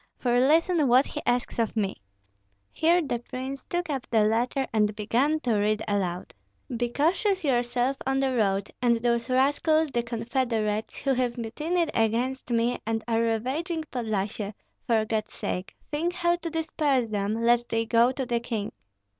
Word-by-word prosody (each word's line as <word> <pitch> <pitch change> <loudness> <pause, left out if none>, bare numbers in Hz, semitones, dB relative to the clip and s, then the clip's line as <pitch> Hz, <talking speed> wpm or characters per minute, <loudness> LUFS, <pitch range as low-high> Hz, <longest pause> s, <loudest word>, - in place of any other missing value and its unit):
For 245 -1 +2
listen 315 +3 +3
what 255 +3 +5
he 295 - -5
asks 245 0 0
of 230 -1 0
me." 195 - -1 0.7
Here 340 +2 +3
the 240 -5 -2
prince 260 +3 -6
took 350 -1 -2
up 275 -5 -3
the 220 -2 +3
letter 240 +5 +1
and 210 -1 +2
began 245 +9 +1
to 240 -5 +1
read 215 +1 +1
aloud, 185 -3 -2 0.4
"Be 240 +1 -1
cautious 365 - +1
yourself 245 0 +1
on 270 0 +1
the 265 -1 +1
road; 200 -3 +1
and 240 -1 +4
those 235 +1 0
rascals, 290 +4 +2
the 240 - +1
confederates, 230 -2 -2
who 275 - +2
have 250 -1 -1
mutinied 305 +9 -1
against 240 +4 0
me 235 +1 +1
and 225 0 -2
are 230 -1 +2
ravaging 265 - -1
Podlyasye, 210 -3 -2 0.3
for 225 -2 +2
God's 215 -1 -2
sake 180 +1 -4 0.2
think 330 +4 -1
how 345 -1 +2
to 340 -1 -5
disperse 305 -5 0
them, 210 0 -2
lest 240 0 +3
they 225 0 0
go 235 +2 +4
to 265 0 -3
the 235 -1 0
king. 225 -3 -3
240 Hz, 165 wpm, -27 LUFS, 225-275 Hz, 0.7 s, what